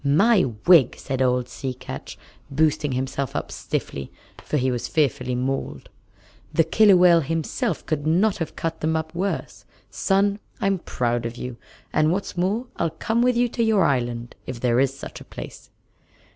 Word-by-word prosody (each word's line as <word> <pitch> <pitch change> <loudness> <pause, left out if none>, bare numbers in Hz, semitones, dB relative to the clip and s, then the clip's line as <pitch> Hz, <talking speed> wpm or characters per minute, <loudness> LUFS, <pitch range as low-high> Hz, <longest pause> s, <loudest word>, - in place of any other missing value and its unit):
"My 185 +9 +4 0.2
wig!" 170 -9 +6
said 135 -1 -3
old 125 -1 +2
Sea 130 -1 -5
Catch, 130 +1 -8 0.3
boosting 150 -1 +1
himself 130 +1 -2
up - - -3
stiffly, 70 -1 -4 0.3
for 150 - -1
he 130 -1 +1
was 120 -1 -2
fearfully 125 -4 0
mauled. 135 +2 -3 0.6
"The 165 - +4
Killer 200 +4 +5
Whale 175 -1 +6
himself 165 - -2
could 155 -2 -2
not 190 +6 +3
have 165 -4 -4
cut 165 0 -3
them 160 +1 +1
up 160 0 -3
worse. 190 +3 -3 0.3
Son, 200 +1 +1 0.2
I'm 195 -1 +1
proud 120 -6 -1
of 115 - -8
you, 125 -1 -5 0.4
and 155 +1 +3
what's 195 +1 -2
more, 195 +7 0
I'll 165 - +1
come 225 +8 -1
with 250 0 +3
you 245 0 +3
to 235 - -2
your 220 -4 +3
island 120 -4 -1
if 125 -2 -5
there 120 0 +2
is 135 0 +3
such - - -9
a - - -8
place." - - -10
155 Hz, 170 wpm, -23 LUFS, 130-190 Hz, 0.6 s, wig